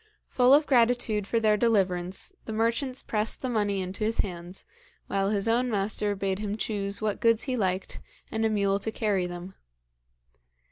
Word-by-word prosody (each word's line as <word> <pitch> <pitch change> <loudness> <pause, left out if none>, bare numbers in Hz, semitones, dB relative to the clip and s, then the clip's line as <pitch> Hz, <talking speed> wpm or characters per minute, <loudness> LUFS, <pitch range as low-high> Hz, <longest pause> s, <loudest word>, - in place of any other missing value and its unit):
Full 250 0 +4
of 300 +1 +3
gratitude 235 -5 +2
for 230 - +1
their 215 -1 +3
deliverance, 195 - 0
the 220 - -5
merchants 230 +4 0
pressed 215 +3 -2
the 260 - -1
money 205 -4 0
into 185 +3 -4
his 225 +2 0
hands, 175 -1 -8 0.4
while 195 0 0
his 205 0 0
own 245 +2 +2
master 205 -1 +1
bade 195 0 -2
him 210 0 -3
choose 205 -1 -3
what 210 -2 -1
goods 230 -1 +3
he 255 - -2
liked, 190 -4 -2 0.3
and 220 0 -1
a 220 - +3
mule 200 -2 +1
to 220 +2 -3
carry 200 -5 0
them. 175 +2 -8
210 Hz, 175 wpm, -27 LUFS, 195-230 Hz, 0.4 s, Full